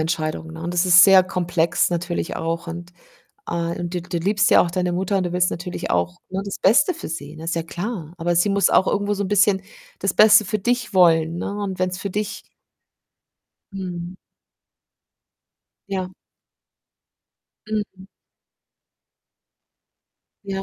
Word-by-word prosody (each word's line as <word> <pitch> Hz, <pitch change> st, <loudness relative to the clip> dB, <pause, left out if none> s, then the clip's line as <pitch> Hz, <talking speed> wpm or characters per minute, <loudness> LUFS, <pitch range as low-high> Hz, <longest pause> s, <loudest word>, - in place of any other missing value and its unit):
Entscheidung, 160 Hz, 0 st, -3 dB
ne, 165 Hz, 0 st, -9 dB
und 175 Hz, +1 st, -4 dB
das 175 Hz, +1 st, +2 dB
ist 180 Hz, 0 st, +8 dB
sehr 195 Hz, -1 st, +7 dB
komplex 175 Hz, -2 st, 0 dB
natürlich 175 Hz, 0 st, -3 dB
auch 165 Hz, +1 st, -3 dB
und, 170 Hz, +1 st, -8 dB, 0.6 s
äh 170 Hz, 0 st, -3 dB
und 175 Hz, 0 st, -4 dB
du 180 Hz, -, -2 dB
du 175 Hz, 0 st, -4 dB
liebst 200 Hz, +4 st, +1 dB
ja -, -, +7 dB
auch 175 Hz, -, -1 dB
deine 180 Hz, 0 st, -1 dB
Mutter 190 Hz, +2 st, 0 dB
und 190 Hz, -, 0 dB
du 175 Hz, -, -4 dB
willst 180 Hz, 0 st, +2 dB
natürlich 175 Hz, +1 st, -5 dB
auch, 90 Hz, 0 st, -1 dB
ne, 190 Hz, -, -3 dB
das 200 Hz, -, -6 dB
Beste 285 Hz, -, +4 dB
für 330 Hz, -, -8 dB
sie, 150 Hz, -1 st, -7 dB
ne? 160 Hz, +1 st, -9 dB
Ist 170 Hz, -, -2 dB
ja 165 Hz, -, -2 dB
klar, 175 Hz, -1 st, -6 dB
aber 175 Hz, +1 st, -1 dB
sie 175 Hz, +4 st, +3 dB
muss 200 Hz, 0 st, +3 dB
auch 190 Hz, -, +3 dB
irgendwo 205 Hz, 0 st, 0 dB
so 200 Hz, -, -2 dB
'n -, -, -3 dB
bisschen 200 Hz, -1 st, +3 dB, 0.4 s
das 195 Hz, -2 st, -1 dB
Beste 215 Hz, 0 st, +6 dB
für 210 Hz, +3 st, -2 dB
dich 245 Hz, +4 st, -1 dB
wollen, 165 Hz, -3 st, +4 dB
ne, 175 Hz, -, -4 dB
und 190 Hz, -2 st, -5 dB
wenn's 185 Hz, 0 st, -1 dB
für 200 Hz, -, -5 dB
dich 210 Hz, +2 st, -4 dB, 1.3 s
Mhm. 180 Hz, -2 st, -6 dB, 1.7 s
Ja. 185 Hz, -2 st, -4 dB, 1.5 s
Mhm. 205 Hz, -3 st, -5 dB, 2.4 s
Ja. 195 Hz, -1 st, -4 dB
180 Hz, 160 wpm, -21 LUFS, 170-195 Hz, 2.4 s, ist